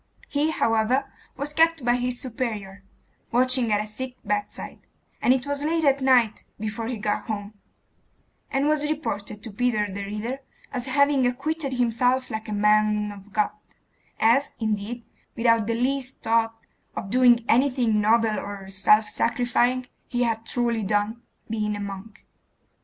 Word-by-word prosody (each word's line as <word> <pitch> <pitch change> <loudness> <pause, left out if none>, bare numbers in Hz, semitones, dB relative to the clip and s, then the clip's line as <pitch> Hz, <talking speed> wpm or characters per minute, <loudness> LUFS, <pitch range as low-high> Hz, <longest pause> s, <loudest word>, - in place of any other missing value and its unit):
He, 295 +2 +1
however, 240 0 +1 0.2
was 285 +2 -4
kept 325 -3 +3
by 240 0 +3
his 245 0 -1
superior, 215 -6 -4 0.5
watching 255 -1 +3
at 205 - +3
a 210 - -2
sick 255 +4 -6
bedside, 205 0 -3 0.4
and - - +4
it 260 0 +2
was 285 0 -2
late 325 +2 +1
at 275 -1 +3
night 245 -5 +3 0.2
before 220 +1 -3
he 245 -1 -3
got 210 0 -2
home, 205 -1 -4 1.0
and 275 +2 +1
was 300 -1 +1
reported 210 -9 -4
to 225 - -5
Peter 215 0 +1
the 200 +1 -4
Reader 215 +6 -4 0.3
as 250 -1 -2
having 280 -1 +3
acquitted 285 +3 -2
himself 250 +1 +1
like 220 0 -5
'a - - -4
man 210 0 +2
of 205 0 -13
God,' 210 0 +1 0.7
as, 235 +6 +3
indeed, 220 +2 -2 0.3
without 230 -2 +3
the 230 - 0
least 260 +2 -2
thought 225 0 +1 0.4
of 195 - -5
doing 245 -2 +5
anything 250 -5 +3
noble 220 0 +3
or 195 -1 -7
self 210 +2 +4
sacrificing, 245 +2 +1 0.2
he 245 0 0
had 225 -1 -1
truly 235 -2 +1
done, 210 +3 0 0.3
being 215 -2 -1
a - - -5
monk. 200 +1 -8
230 Hz, 150 wpm, -25 LUFS, 210-255 Hz, 1.0 s, doing